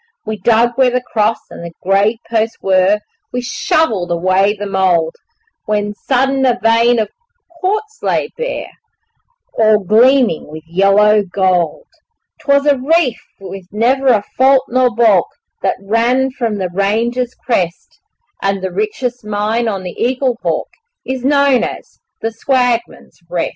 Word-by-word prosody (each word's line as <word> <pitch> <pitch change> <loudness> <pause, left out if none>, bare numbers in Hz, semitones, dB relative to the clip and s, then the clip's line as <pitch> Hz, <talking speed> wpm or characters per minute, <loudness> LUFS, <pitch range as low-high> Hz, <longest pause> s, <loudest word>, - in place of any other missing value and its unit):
We 220 0 -4
dug 230 +4 +3
where 260 -2 +4
the 250 0 -1
cross 220 0 +2
and - - -9
the 170 0 -8
grave 200 +4 +2
posts 225 0 -1
were, 190 +2 +2 0.3
We 250 - -2
shovelled 235 - 0
away 185 +4 +2
the 205 - -5
mould, 185 -4 +1 0.5
When 210 -1 -1
sudden 265 +4 0
a 250 -2 +2
vein 230 +2 +3
of 215 -2 0 0.5
quartz 425 +5 -2
lay - - 0
bare - - -4 0.9
All 215 -1 +5
gleaming 235 - +3
with 155 +1 -10
yellow 195 +5 +3
gold. 185 - 0 0.5
'Twas 280 -2 +2
a 285 -3 +3
reef 285 -3 +1 0.2
with 190 -1 -9
never 255 +6 +1
a 220 -5 +4
fault 265 +1 +4
nor 255 0 +3
baulk 225 -6 +3 0.3
That - - 0
ran 235 +6 +1
from 235 -5 -2
the 185 -2 -2
range's 235 +6 -1
crest, 180 -8 -3 0.4
And 195 -1 -1
the 190 - -2
richest 220 +6 -3
mine 215 +3 -1
on 195 -4 -3
the 180 - -6
Eaglehawk 255 0 -1 0.3
Is 260 -1 -4
known 280 -3 +3
as - - -7 0.2
'The 225 - -1
Swagman's 245 0 -1
Rest'. 175 -2 -1
225 Hz, 145 wpm, -15 LUFS, 195-255 Hz, 0.9 s, All